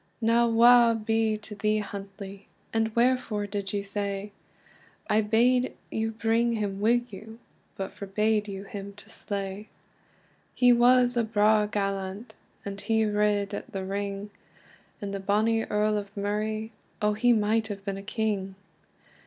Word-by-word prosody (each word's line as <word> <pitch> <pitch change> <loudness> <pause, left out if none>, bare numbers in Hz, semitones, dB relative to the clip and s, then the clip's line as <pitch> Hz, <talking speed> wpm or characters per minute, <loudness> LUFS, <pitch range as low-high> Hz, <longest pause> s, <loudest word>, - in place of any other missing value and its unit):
"Now 235 +1 +3
wae 235 0 +6
be 225 0 0
to 210 0 -11
thee, 215 +1 0
Huntly! 200 -1 -7 0.3
And 225 0 +2
wherefore 235 -4 +1
did 200 -1 -4
you 200 -1 -2
sae? 200 0 -4 0.8
I 215 - +3
bade 245 +4 +2 0.2
you 220 0 -1
bring 225 +2 +1
him 205 -3 -2
wi 235 +3 +3
you, 220 +3 -10 0.4
But 195 0 -4
forbade 210 +2 0
you 195 -1 -6
him 200 0 -8
to 220 +2 -14
slay." 200 0 -5 0.9
He 245 -1 +6
was 245 +1 +4
a 235 - +2
braw 215 -1 +3
gallant, 200 +2 -3 0.3
And 200 0 -5
he 220 -1 +1
rid 210 -1 +1
at - - -6
the 190 -1 -3
ring; 200 +1 -4 0.7
And 200 -1 -4
the 195 - -3
bonny 215 +3 +1
Earl 210 0 +1
of 200 +1 -10
Murray, 215 +2 -2 0.3
Oh 210 0 +2
he 240 +4 +3
might 220 0 +2
have 200 -2 -7
been 195 -1 -3
a - - -6
King! 200 -2 -2
210 Hz, 150 wpm, -27 LUFS, 200-225 Hz, 0.9 s, wae